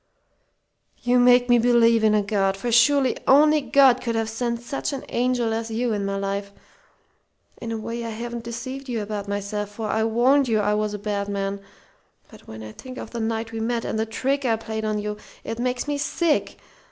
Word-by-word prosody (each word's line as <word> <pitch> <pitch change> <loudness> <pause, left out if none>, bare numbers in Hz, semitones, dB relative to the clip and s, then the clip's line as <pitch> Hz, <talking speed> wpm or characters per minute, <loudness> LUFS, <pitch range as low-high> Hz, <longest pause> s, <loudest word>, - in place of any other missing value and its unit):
"You 245 0 +3
make 245 0 +5
me 240 -1 +5
believe 230 -1 +4
in 215 -1 +4
a 210 - +2
God, 195 -1 0
for 240 +4 -3
surely 260 +3 +4
only 300 +2 +6
God 270 -3 +4
could 235 -2 -2
have 225 0 -1
sent 235 +1 -3
such 275 +5 -3
an 270 - -5
angel 245 -2 0
as 225 0 -3
you 230 +1 -1
into 200 -1 -2
my 200 - -2
life.... 200 0 -3 1.1
In 230 - -4
a 225 - -2
way, 230 +2 -5
I 230 - -4
haven't 235 +1 -5
deceived 260 +3 -6
you 230 -3 -2
about 205 -1 -5
myself, 205 +1 -3
for 215 +1 -5
I 220 +1 +1
warned 255 +5 +3
you 220 -2 +2
I 210 0 +1
was 210 0 -1
a - - -4
bad 205 -1 -3
man. 200 0 -3 0.7
But - - -16
when 110 0 -9
I 110 - -8
think 255 - -10
of - - -7
the 235 - -5
night 225 0 -2
we 225 - -5
met 230 +1 -1
and 220 - -2
the 220 - -1
trick 270 +6 -1
I 235 -3 +2
played 220 0 -5
on 215 0 0
you, 210 0 -4 0.3
it 225 +1 -5
makes 250 +2 -1
me 290 -1 -1
sick! 320 +1 0
230 Hz, 215 wpm, -23 LUFS, 210-245 Hz, 1.1 s, only